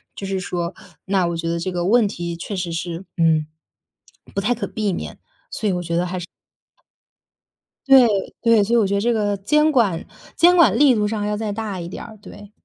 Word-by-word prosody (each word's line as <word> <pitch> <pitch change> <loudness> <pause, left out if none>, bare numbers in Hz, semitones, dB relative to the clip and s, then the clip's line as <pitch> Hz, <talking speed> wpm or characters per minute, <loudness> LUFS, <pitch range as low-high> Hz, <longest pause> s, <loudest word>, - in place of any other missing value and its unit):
就 195 - -6
是 195 0 -2
说 175 -1 -3 0.3
那 190 -2 +1
我 170 - -2
觉 165 0 -4
得 170 - -1
这 185 +2 -3
个 175 -1 -2
问 225 +1 +4
题 170 -3 -5
确 185 +5 -6
实 180 -2 -3
是， 170 +2 -4
嗯， 160 -2 +2 0.9
不 - - +1
太 240 +5 +1
可 235 - -4
避 210 -4 -2
免， - - -5
所 - - -24 0.6
以 170 -1 -5
我 - - +1
觉 - - +1
得 175 - +1
还 185 - -4
是 175 - -6 1.6
对， 265 -3 +7 0.3
对， 230 -3 +4
所 225 +4 -1
以 - - +5
我 220 - +3
觉 195 - -1
得 200 - +1
这 240 +3 +1
个 205 -2 0
监 300 +10 +2
管 210 - +1 0.3
监 350 +1 +5
管 270 - +5
力 280 -1 +6
度 210 -2 +1
上 210 -1 -2
要 210 0 -1
再 215 -1 -3
大 205 -2 -4
一 170 - -6
点 - - -8
儿， 220 -2 -12
对。 205 0 -13
200 Hz, 235 characters per minute, -21 LUFS, 175-225 Hz, 1.6 s, 对